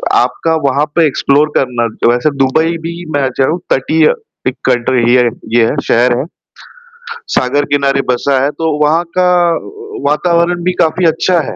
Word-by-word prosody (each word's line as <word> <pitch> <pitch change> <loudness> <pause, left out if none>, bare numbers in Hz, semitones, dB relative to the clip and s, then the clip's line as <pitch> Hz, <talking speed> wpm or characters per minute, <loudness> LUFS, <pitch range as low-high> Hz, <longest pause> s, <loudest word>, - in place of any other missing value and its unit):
आपका 145 +6 +1
वहाँ 140 +2 +1
पे 165 -2 +4
एक्सप्लोर 145 +2 +1
करना 120 -3 0 0.2
जो 120 - +5
वैसे 125 +5 +1
दुबई 160 +5 +1
भी 170 - -4 0.2
मैं 140 -2 0
जाऊँ 155 +7 +1
ताकि 155 +4 +1
अ, - - +3 0.3
एक 130 - -1
कल्टर 125 0 +1
एरिया 120 +2 +3
है 120 - +2 0.3
ये 115 -1 +4
है, 130 - -1
शहर 120 +1 +2
है। 140 - -3 1.1
सागर 140 +3 +1
किनारे 140 -1 +1
बसा 130 +2 +1
है, 140 - +1
तो 160 0 -2
वहाँ 160 +3 +2
का 180 0 +3 0.3
व 420 +1 -10
वातावरण 170 +3 +1
भी 180 0 0
काफ़ी 170 +2 +1
अच्छा 170 +2 +2
है। - - -7
145 Hz, 175 wpm, -13 LUFS, 130-165 Hz, 1.1 s, जो